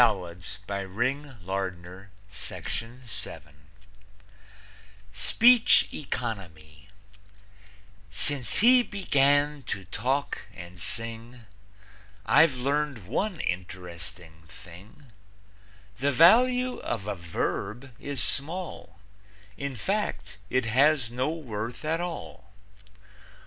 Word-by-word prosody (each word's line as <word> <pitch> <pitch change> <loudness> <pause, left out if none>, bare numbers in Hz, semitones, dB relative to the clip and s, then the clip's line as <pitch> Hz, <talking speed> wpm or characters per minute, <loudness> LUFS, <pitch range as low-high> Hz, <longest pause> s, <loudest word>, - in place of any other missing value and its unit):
SPEECH 230 - +5
ECONOMY 95 - -6 1.2
Since 120 +3 0
he 245 +4 +7
began 145 - +2
to 100 -2 -3
talk 130 +9 -1 0.2
and 85 0 -10
sing, 115 +3 -2 0.8
I've 150 +1 +5
learned 140 -4 -1
one 180 - -1
interesting 90 -2 -6
thing 100 - -14 0.9
The 140 +2 +2
value 250 - +5
of 110 -5 -3
a 105 - -2
verb 100 +7 -3
is 140 -5 -1
small; 160 - -1 0.6
In 140 +2 -4
fact, 190 - -2
it 130 -1 +1
has 130 +1 +3
no 125 +4 0
worth 120 -5 -5
at 165 +2 0
all. 165 - -7
125 Hz, 75 wpm, -27 LUFS, 100-150 Hz, 1.2 s, he